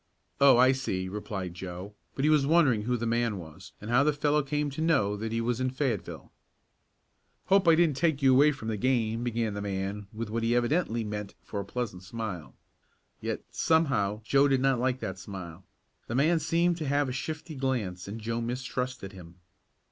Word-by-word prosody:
"Oh, 140 -3 +7
I 130 +1 +6
see," 95 -9 -2
replied 95 -2 -5
Joe, 90 +3 -7 0.2
but 135 - 0
he - - +4
was 145 -3 +3
wondering 145 -9 +4
who 125 +3 0
the 115 - -3
man 115 -2 0
was, 85 +2 -11
and 105 +3 -6
how 125 +3 +5
the 150 - +3
fellow 145 +1 +2
came 145 +1 -2
to 140 - -5
know 135 -12 +2
that 110 +2 -4
he 115 0 0
was 120 +1 -1
in 130 - +1
Fayetteville. 130 -6 -3 1.1
"Hope 195 -1 +3
I 165 - +8
didn't 160 -5 +3
take 160 -3 +2
you 135 -2 +5
away 145 +4 +6
from 125 -6 -7
the 110 - -2
game," 115 -1 0
began 115 -3 -1
the 100 - -4
man 100 +1 -3
with 110 0 -5
what 115 +1 -1
he 115 +1 +1
evidently 120 -1 +1
meant 105 -1 -5
for 100 - -5
a 100 - -4
pleasant 110 -5 -4
smile. 95 -3 -6 0.6
Yet, - - -4
somehow 115 -11 +1
Joe 140 +5 +4
did 135 -2 +2
not 135 -2 +2
like 130 +1 0
that 95 0 -4
smile. 90 -2 -8 0.4
The 120 - -3
man 160 +5 +3
seemed 170 +1 +1
to 155 -4 -4
have 145 0 +2
a - - -3
shifty 155 +5 -5
glance 120 -10 -2
and 105 +3 -6
Joe 115 +1 -2
mistrusted 125 -2 -4
him. 90 -3 -12
120 Hz, 200 wpm, -28 LUFS, 105-140 Hz, 1.1 s, I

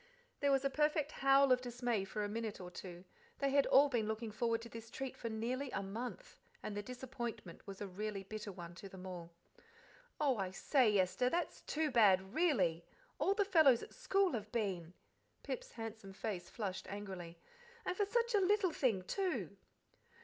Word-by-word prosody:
There 285 -1 +3
was 270 0 +3
a - - +4
perfect 300 0 +2
howl 275 0 +5
of 250 0 +5
dismay 245 -4 -1
for 210 +2 -3
a - - 0
minute 220 0 -3
or 180 -1 -7
two. 180 0 -8 0.3
They 275 -1 +1
had 280 0 +4
all 280 +2 +7
been 235 -6 0
looking 220 0 -3
forward 230 +1 +1
to 235 - -9
this 230 0 -9
treat 270 +2 -5
for 230 - -4
nearly 245 +5 -2
a 195 - -2
month, 240 - -6 0.2
and 210 - -4
the 205 - -1
disappointment 240 -6 -6
was 195 0 -7
a 205 - -2
really 200 +1 -4
bitter 210 +1 -6
one 175 -2 -8
to 195 +3 -9
them 190 -1 -10
all. 175 -2 -7 0.9
"Oh, 275 -5 +3
I 190 -2 -1
say, 215 +2 +3
Esther, 190 +7 +2
that's 345 +5 -1
too 310 -1 -1
bad, 195 -5 +5
really! 190 - +2 0.4
All 370 +8 +3
the 405 -1 +3
fellows 315 - +6
at - - -10
school 390 -2 +2
have 215 -2 -4
been." 185 -7 -2 0.5
Pip's - - -5
handsome 220 -3 -7
face 190 -4 -4
flushed 195 -4 -4
angrily. 190 -4 -6 0.5
"And 365 - -1
for 410 - +2
such 475 +2 +1
a 415 - +5
little 390 -1 +3
thing, 225 -11 +1
too!" 375 - -2
230 Hz, 185 wpm, -37 LUFS, 195-275 Hz, 0.9 s, all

